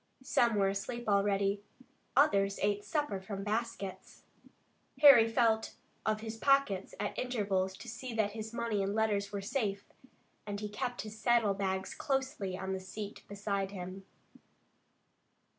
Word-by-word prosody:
Some 235 -3 +3
were 200 -1 +3
asleep 230 +5 -4
already. 200 0 +2 0.6
Others 200 -9 +4
ate 205 0 +3
their 205 - -14
suppers 295 - -1
from 195 0 -5
baskets. 210 -2 -4 0.8
Harry 270 -6 +9
felt 225 -2 +2 0.3
of 215 0 +1
his 225 0 -5
pockets 275 -8 +2
at - - -2
intervals 195 -6 0
to 240 - -11
see 240 +2 -6
that 215 -2 +1
his 220 +1 -6
money 235 -3 -1
and 195 +1 -1
letters 205 -2 +1
were 200 -1 -3
safe, 205 -4 -1 0.6
and 205 0 -3
he 210 0 -4
kept 245 +3 -3
his 215 0 -9
saddle 235 -4 +3
bags 190 -1 -2
closely 265 -9 -2
on 190 0 -3
the 190 - -2
seat 200 +2 -7
beside 200 -1 -2
him. 190 0 -7
205 Hz, 145 wpm, -33 LUFS, 195-235 Hz, 0.8 s, Harry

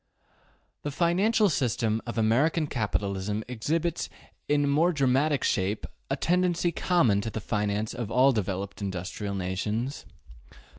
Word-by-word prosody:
The 145 - -3
financial 185 +9 +2
economy 120 - +1
of 120 - -4
American 135 +9 +2
capitalism 105 - -2
exhibits 160 +8 -1 0.4
in 145 -1 +2
more 155 +5 +3
dramatic 140 0 +2
shape 100 +2 0 0.2
a 135 - +1
tendency 175 +2 +1
common 130 - +2
to 115 - -3
the 110 - -4
finance 105 0 -1
of 115 -4 -4
all 130 +3 +5
developed 100 -3 -3
industrial 100 +1 -4
nations. 105 +8 -3
120 Hz, 120 wpm, -27 LUFS, 105-150 Hz, 0.4 s, all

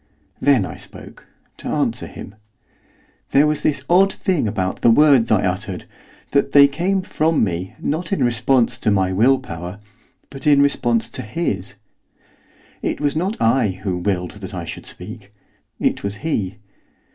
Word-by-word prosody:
Then 130 -7 +3
I - - -8
spoke, - - -11 0.3
to - - -8
answer - - -1
him. 100 - -10 1.0
There 140 +2 +4
was 150 -1 0
this 140 -3 0
odd 190 +3 +5
thing 180 - -1
about 95 -2 -2
the - - +5
words 135 -1 +5
I 105 -2 +3
uttered, 95 0 -3 0.5
that 140 0 +1
they 140 -1 +8
came 180 +7 -1
from 160 -4 +1
me, 90 -2 -3
not 165 +4 -3
in 195 - +1
response 120 +1 +2
to - - 0
my 95 -2 +2
will 125 +8 +4
power, 90 0 -7 0.5
but 135 0 -5
in 145 -1 +6
response 120 -5 +1
to - - -5
his. 110 - -3 1.1
It - - -2
was 145 0 0
not 190 +7 -2
I 115 -5 +2
who 95 -3 -1
willed 90 -1 -1
that 95 0 -7
I 85 -2 -5
should - - -8
speak; 105 +2 -8 0.5
it - - 0
was 100 0 -2
he. 100 - -1
120 Hz, 160 wpm, -20 LUFS, 95-145 Hz, 1.1 s, they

